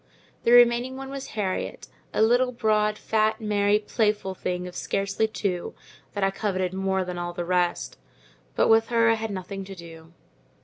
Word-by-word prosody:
The 235 Hz, -, +4 dB
remaining 245 Hz, +2 st, +5 dB
one 270 Hz, 0 st, -7 dB
was 275 Hz, -1 st, -6 dB
Harriet, 190 Hz, -3 st, -3 dB, 0.2 s
a -, -, +2 dB
little 245 Hz, +3 st, +3 dB
broad, 215 Hz, -3 st, +1 dB
fat, 220 Hz, +1 st, +1 dB
merry, 205 Hz, -1 st, +2 dB
playful 210 Hz, -2 st, 0 dB
thing 180 Hz, -1 st, -3 dB
of 180 Hz, -, -10 dB
scarcely 200 Hz, +3 st, -1 dB
two, 195 Hz, -5 st, -3 dB, 0.4 s
that 200 Hz, -, -2 dB
I 195 Hz, -, +3 dB
coveted 185 Hz, -2 st, -2 dB
more 190 Hz, 0 st, 0 dB
than 180 Hz, -1 st, -5 dB
all 175 Hz, 0 st, -4 dB
the 175 Hz, 0 st, -4 dB
rest—but -, -, -2 dB
with 225 Hz, 0 st, +5 dB
her 230 Hz, -1 st, +3 dB
I -, -, +5 dB
had 225 Hz, 0 st, -3 dB
nothing 195 Hz, 0 st, -5 dB
to 195 Hz, 0 st, -9 dB
do. 165 Hz, -2 st, -12 dB
200 Hz, 170 wpm, -25 LUFS, 180-225 Hz, 0.4 s, remaining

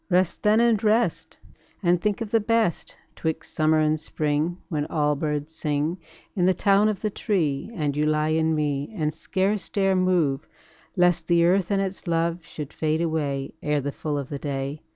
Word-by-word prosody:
Rest 180 Hz, -1 st, +1 dB
then 210 Hz, +1 st, +4 dB
and 235 Hz, -2 st, +3 dB
rest, 210 Hz, -7 st, +1 dB, 0.5 s
And 175 Hz, -1 st, +3 dB
think 210 Hz, +3 st, 0 dB
of 220 Hz, -2 st, -4 dB
the 225 Hz, -, +4 dB
best 220 Hz, -4 st, 0 dB, 0.2 s
'Twixt 160 Hz, -1 st, -4 dB
summer 155 Hz, 0 st, +3 dB
and 155 Hz, 0 st, +2 dB
spring, 155 Hz, +2 st, -1 dB
When 150 Hz, -4 st, -2 dB
all 150 Hz, -1 st, +1 dB
birds 150 Hz, +1 st, -3 dB
sing 155 Hz, +3 st, -1 dB, 0.4 s
In 180 Hz, -2 st, +2 dB
the 185 Hz, -, +3 dB
town 200 Hz, +1 st, +4 dB
of 210 Hz, -, -3 dB
the 215 Hz, -, -1 dB
tree, 165 Hz, -9 st, -1 dB
And 150 Hz, -6 st, -1 dB
ye 150 Hz, -, +1 dB
lie 155 Hz, 0 st, +1 dB
in 160 Hz, 0 st, +2 dB
me 145 Hz, 0 st, -1 dB
And 155 Hz, -2 st, 0 dB
scarce 190 Hz, +4 st, -1 dB
dare 195 Hz, -1 st, +2 dB
move, 175 Hz, -7 st, +1 dB, 0.5 s
Lest 175 Hz, -2 st, +2 dB
the 170 Hz, -1 st, +4 dB
earth 185 Hz, +1 st, +2 dB
and 195 Hz, -1 st, +1 dB
its 190 Hz, -1 st, -6 dB
love 170 Hz, 0 st, 0 dB
Should 150 Hz, -2 st, -8 dB
fade 155 Hz, 0 st, 0 dB
away 145 Hz, -5 st, -2 dB
Ere 150 Hz, -1 st, +1 dB
the 145 Hz, +1 st, -3 dB
full 150 Hz, +1 st, -3 dB
of 140 Hz, -2 st, -4 dB
the 140 Hz, -, -5 dB
day. 140 Hz, +1 st, -4 dB
160 Hz, 190 wpm, -25 LUFS, 150-190 Hz, 0.5 s, then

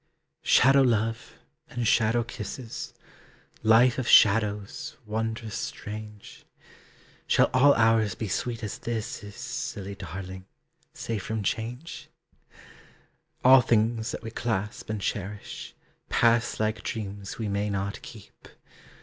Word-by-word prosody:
Shadow 135 Hz, +2 st, +5 dB
love 115 Hz, -3 st, 0 dB, 0.3 s
and 120 Hz, -2 st, -2 dB
shadow 115 Hz, +2 st, +3 dB
kisses, 115 Hz, +1 st, -7 dB, 0.7 s
Life 115 Hz, +3 st, +5 dB
of 125 Hz, -, -3 dB
shadows, 105 Hz, -1 st, +3 dB
wondrous 110 Hz, 0 st, -3 dB
strange! 105 Hz, 0 st, -7 dB, 0.8 s
Shall -, -, +4 dB
all 140 Hz, +2 st, +6 dB
hours 115 Hz, -3 st, +3 dB
be 110 Hz, -, -4 dB
sweet 115 Hz, +4 st, -3 dB
as 105 Hz, -, -4 dB
this 115 Hz, 0 st, -4 dB
is, 100 Hz, 0 st, -10 dB
Silly 100 Hz, 0 st, -5 dB
darling, 95 Hz, 0 st, -8 dB, 0.4 s
safe 115 Hz, -3 st, -4 dB
from 110 Hz, +2 st, -3 dB
change? 120 Hz, -, -4 dB, 1.4 s
All 130 Hz, 0 st, +9 dB
things 115 Hz, 0 st, +1 dB
that -, -, -5 dB
we 115 Hz, -, -6 dB
clasp 110 Hz, 0 st, -3 dB
and 110 Hz, -1 st, -2 dB
cherish, 100 Hz, +1 st, -5 dB, 0.3 s
Pass 115 Hz, 0 st, +2 dB
like 110 Hz, 0 st, 0 dB
dreams 100 Hz, -3 st, -5 dB
we 110 Hz, -3 st, -3 dB
may 100 Hz, +1 st, -1 dB
not 100 Hz, 0 st, -3 dB
keep. 110 Hz, -4 st, -13 dB
110 Hz, 115 wpm, -27 LUFS, 105-115 Hz, 1.4 s, All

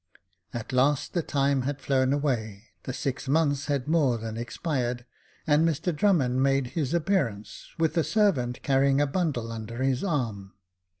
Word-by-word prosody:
At 120 Hz, +2 st, -6 dB
last 135 Hz, +2 st, +2 dB
the 175 Hz, -, +1 dB
time 140 Hz, -3 st, +1 dB
had 140 Hz, +2 st, -3 dB
flown 130 Hz, -1 st, +1 dB
away, 115 Hz, -8 st, -2 dB, 0.2 s
the -, -, -3 dB
six 130 Hz, +1 st, -4 dB
months 145 Hz, -1 st, +1 dB
had 140 Hz, -3 st, -1 dB
more 150 Hz, -7 st, +2 dB
than 110 Hz, -1 st, -6 dB
expired, 120 Hz, 0 st, -3 dB, 0.4 s
and 150 Hz, +1 st, +4 dB
Mr 165 Hz, +1 st, 0 dB
Drummond 145 Hz, -9 st, +2 dB
made 135 Hz, 0 st, +2 dB
his 155 Hz, -1 st, -1 dB
appearance, 135 Hz, -, -1 dB
with 160 Hz, -1 st, +1 dB
a 165 Hz, -, +3 dB
servant, 150 Hz, -, +1 dB
carrying 135 Hz, 0 st, +3 dB
a 145 Hz, -, +3 dB
bundle 135 Hz, -7 st, -1 dB
under 115 Hz, +2 st, -5 dB
his 135 Hz, -1 st, +1 dB
arm. 115 Hz, -, -2 dB
135 Hz, 160 wpm, -27 LUFS, 120-150 Hz, 0.4 s, and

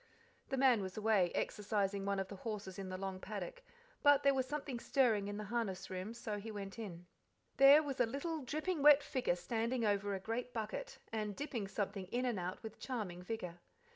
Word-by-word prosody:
The 270 Hz, -, -1 dB
man 255 Hz, -5 st, +5 dB
was 190 Hz, 0 st, -5 dB
away, 210 Hz, -5 st, +3 dB
exercising 200 Hz, -2 st, 0 dB
one 200 Hz, 0 st, +1 dB
of 195 Hz, 0 st, -1 dB
the 200 Hz, -, -8 dB
horses 200 Hz, -2 st, -5 dB
in 190 Hz, -1 st, -5 dB
the 185 Hz, -, -4 dB
long 190 Hz, -1 st, -4 dB
paddock; 205 Hz, -, -6 dB, 0.4 s
but 290 Hz, -1 st, +6 dB
there 280 Hz, 0 st, +5 dB
was 260 Hz, -1 st, 0 dB
something 280 Hz, -3 st, -3 dB
stirring 230 Hz, -7 st, +2 dB
in 205 Hz, 0 st, -4 dB
the 210 Hz, -, -4 dB
harness 200 Hz, -4 st, -2 dB
room, 190 Hz, +5 st, -4 dB
so 220 Hz, -3 st, -4 dB
he 220 Hz, +2 st, -7 dB
went 200 Hz, -1 st, -6 dB
in. 180 Hz, -6 st, -7 dB, 0.5 s
There 280 Hz, +3 st, +9 dB
was 280 Hz, -3 st, -4 dB
a 245 Hz, -, +4 dB
little, 305 Hz, +6 st, -3 dB
dripping 310 Hz, +5 st, -2 dB
wet 295 Hz, 0 st, +8 dB
figure 255 Hz, -11 st, 0 dB
standing 230 Hz, +6 st, -1 dB
over 205 Hz, -1 st, +1 dB
a -, -, -3 dB
great 235 Hz, +5 st, -3 dB
bucket, 225 Hz, -, -4 dB, 0.2 s
and 210 Hz, -2 st, -2 dB
dipping 240 Hz, -7 st, -3 dB
something 195 Hz, -1 st, -3 dB
in 245 Hz, +6 st, -1 dB
and 235 Hz, -6 st, 0 dB
out 180 Hz, +5 st, -4 dB
with 220 Hz, -1 st, -8 dB
charming 205 Hz, -9 st, -4 dB
vigour. 180 Hz, -3 st, -5 dB
215 Hz, 200 wpm, -36 LUFS, 195-255 Hz, 0.5 s, There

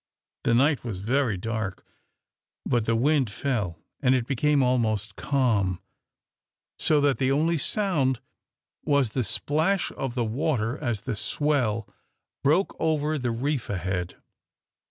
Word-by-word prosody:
The 115 Hz, -, +4 dB
night 140 Hz, +3 st, +3 dB
was 110 Hz, -7 st, -4 dB
very 120 Hz, 0 st, +1 dB
dark, 105 Hz, -1 st, -4 dB, 0.8 s
but 120 Hz, -3 st, +1 dB
the 115 Hz, -, +2 dB
wind 135 Hz, 0 st, +2 dB
fell, 105 Hz, -7 st, -2 dB, 0.2 s
and 130 Hz, -2 st, +4 dB
it 125 Hz, -2 st, 0 dB
became 140 Hz, +2 st, +2 dB
almost 110 Hz, -5 st, 0 dB
calm, 110 Hz, -10 st, +1 dB, 1.0 s
so 150 Hz, -, +3 dB
that 140 Hz, -4 st, +2 dB
the 130 Hz, 0 st, +2 dB
only 160 Hz, +3 st, +2 dB
sound 145 Hz, -, +1 dB, 0.6 s
was 140 Hz, -6 st, +2 dB
the 125 Hz, +2 st, 0 dB
splash 160 Hz, -, 0 dB
of 135 Hz, -3 st, -4 dB
the 120 Hz, -2 st, 0 dB
water 120 Hz, -1 st, 0 dB
as 120 Hz, -8 st, -2 dB
the 125 Hz, -, -3 dB
swell 115 Hz, -1 st, 0 dB, 0.6 s
broke 165 Hz, +8 st, +2 dB
over 155 Hz, -1 st, +1 dB
the 125 Hz, -2 st, -1 dB
reef 130 Hz, +3 st, -2 dB
ahead. 90 Hz, -2 st, -2 dB
125 Hz, 135 wpm, -26 LUFS, 110-145 Hz, 1.0 s, The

